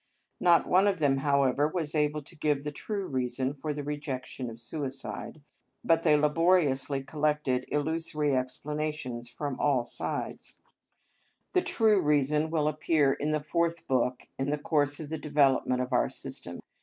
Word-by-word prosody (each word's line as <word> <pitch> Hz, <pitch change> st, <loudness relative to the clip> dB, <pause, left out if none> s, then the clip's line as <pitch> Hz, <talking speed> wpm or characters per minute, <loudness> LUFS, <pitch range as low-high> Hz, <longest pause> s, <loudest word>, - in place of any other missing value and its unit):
Not 170 Hz, -1 st, +5 dB
one 190 Hz, +3 st, +4 dB
of 200 Hz, -2 st, +2 dB
them, 140 Hz, -4 st, +2 dB
however, 140 Hz, 0 st, +2 dB
was 155 Hz, -2 st, -3 dB
able 150 Hz, -1 st, 0 dB
to 155 Hz, -, -15 dB
give 150 Hz, -2 st, 0 dB
the 150 Hz, -, -3 dB
true 200 Hz, +6 st, -4 dB
reason 130 Hz, -1 st, -1 dB
for 150 Hz, +2 st, -4 dB
the 145 Hz, 0 st, -4 dB
rejection 140 Hz, -3 st, -4 dB
of 115 Hz, 0 st, -10 dB
suicide, 140 Hz, +3 st, -5 dB, 0.4 s
but 165 Hz, 0 st, +3 dB
they 155 Hz, -3 st, +4 dB
laboriously 150 Hz, -3 st, +2 dB
collected 150 Hz, -4 st, 0 dB
illusory 150 Hz, -1 st, 0 dB
explanations 130 Hz, -2 st, -3 dB
from 140 Hz, 0 st, -5 dB
all 135 Hz, -5 st, +2 dB
sides: -, -, -5 dB, 1.0 s
the 365 Hz, -, +3 dB
true 220 Hz, -, +3 dB
reason 150 Hz, +1 st, +2 dB
will 155 Hz, -2 st, +1 dB
appear 155 Hz, -2 st, +2 dB
in 145 Hz, +2 st, -2 dB
the 155 Hz, 0 st, +1 dB
Fourth 170 Hz, +2 st, -1 dB
Book 125 Hz, -1 st, 0 dB
in 135 Hz, +1 st, 0 dB
the 150 Hz, -, 0 dB
course 145 Hz, -1 st, 0 dB
of 155 Hz, -3 st, -7 dB
the 160 Hz, -1 st, -3 dB
development 135 Hz, -4 st, +2 dB
of 125 Hz, +1 st, -5 dB
our 120 Hz, -, +3 dB
system. -, -, -7 dB
150 Hz, 155 wpm, -29 LUFS, 135-155 Hz, 1.0 s, Not